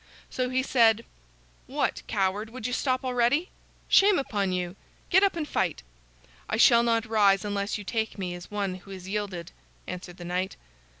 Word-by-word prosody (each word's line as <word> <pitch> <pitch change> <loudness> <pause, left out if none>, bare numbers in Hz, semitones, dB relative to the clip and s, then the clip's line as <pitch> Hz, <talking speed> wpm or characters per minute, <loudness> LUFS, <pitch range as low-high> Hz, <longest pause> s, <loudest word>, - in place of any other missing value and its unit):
So 255 -1 -1
he 260 +1 +1
said: 230 -4 +4 0.6
"What, - - -1
coward, 205 +1 0
would 235 -1 -8
you 250 - -1
stop 255 0 0
already? 250 +7 +1 0.4
Shame 395 -1 +6
upon 205 -8 -1
you! 180 0 -2 0.4
Get 380 +1 +6
up 395 -2 +3
and 315 -3 -3
fight." 180 - -1 0.7
"I - - 0
shall 235 +1 +7
not 230 -1 +1
rise 205 -2 +3
unless 200 0 -2
you 205 - -7
take 220 +2 -2
me 185 -3 -3
as 175 0 -9
one 200 -2 -2
who 195 - -17
has 190 -1 -8
yielded," 190 -4 -4 0.3
answered 180 -1 -7
the 175 - -8
knight. 180 +2 -2
210 Hz, 175 wpm, -27 LUFS, 190-250 Hz, 0.7 s, shall